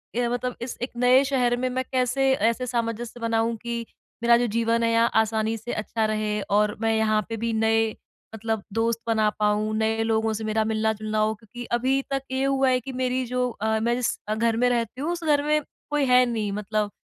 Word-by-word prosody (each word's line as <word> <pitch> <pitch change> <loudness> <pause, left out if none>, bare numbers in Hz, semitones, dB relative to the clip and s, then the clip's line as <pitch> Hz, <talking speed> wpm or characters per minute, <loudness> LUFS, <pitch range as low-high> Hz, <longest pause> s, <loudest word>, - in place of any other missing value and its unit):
ये 240 0 +1
मतलब 245 +1 -2
इस 240 +1 -5
एक 245 - -3
नए 250 +2 +5
शहर 250 -3 +1
में 255 +1 -1
मैं 260 +1 -1
कैसे 260 +1 +2
ऐसे 230 +1 +1
सामंजस्य 235 0 -3
बनाऊँ 230 0 0
कि, 235 +1 -4 0.4
मेरा 235 0 +6
जो 245 - +1
जीवन 230 0 +1
है 230 - +2
यहाँ 230 +1 +3
आसानी 220 0 +2
से 225 +2 -7
अच्छा 220 +1 -1
रहे 215 -1 -1
और 210 +1 +3
मैं 225 0 +2
यहाँ 215 -1 +2
पे 225 - -3
भी 230 +1 -1
नए 225 0 +2 0.5
मतलब 220 -1 -2
दोस्त 230 +1 0
बना 220 -2 +3
पाऊँ 210 +1 +1
नए 220 0 +1
लोगों 225 0 +1
से 220 +1 -4
मेरा 220 0 +1
मिलना-जुलना 215 0 -1
हो 215 0 +2
क्योंकि 235 +3 -10
अभी 265 +3 +1
तक 275 0 0
ये 260 0 0
हुआ 270 -1 +2
है 255 0 +3
कि 265 +2 -7
मेरी 255 0 0
जो 250 +1 -1
अ, 220 -1 -1
मैं 235 +2 +1
जिस 245 -1 -1
अ, 215 - 0
घर 225 0 +1
में - - +5
रहती 240 +1 -1
हूँ 315 +4 -1
उस 345 -1 -4
घर 295 -2 +2
में 300 +1 +2 0.3
कोई 295 -1 +1
है 250 0 +5
नहीं 220 -4 -2
मतलब, 210 +1 -2
230 Hz, 220 wpm, -25 LUFS, 220-250 Hz, 0.5 s, मेरा